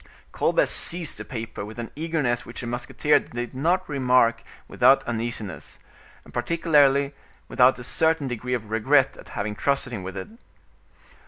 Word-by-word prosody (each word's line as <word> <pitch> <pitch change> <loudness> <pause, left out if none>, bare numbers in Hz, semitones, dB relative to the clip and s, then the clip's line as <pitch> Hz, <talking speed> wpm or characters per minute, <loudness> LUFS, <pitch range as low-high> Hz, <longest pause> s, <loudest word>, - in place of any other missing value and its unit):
Colbert - - +2
seized 170 -2 -1
the - - -5
paper 110 -4 -6
with 110 +3 -9
an 115 -1 -6
eagerness 150 -7 -1
which 120 - -8
the - - -6
musketeer 125 +5 +1
did 120 +1 -6
not 175 +8 0
remark 125 -4 +2 0.3
without - - +4
uneasiness, 115 -4 -5 0.5
and - - -16
particularly 145 -4 +3 0.3
without 125 0 +4
a 125 - -8
certain 160 +2 +1
degree 125 0 -2
of 110 -3 -7
regret 135 +5 +3
at - - -13
having 105 0 -2
trusted 135 +2 -1
him 105 - -4
with 95 +1 -7
it. 95 - -6
125 Hz, 155 wpm, -24 LUFS, 115-145 Hz, 0.5 s, without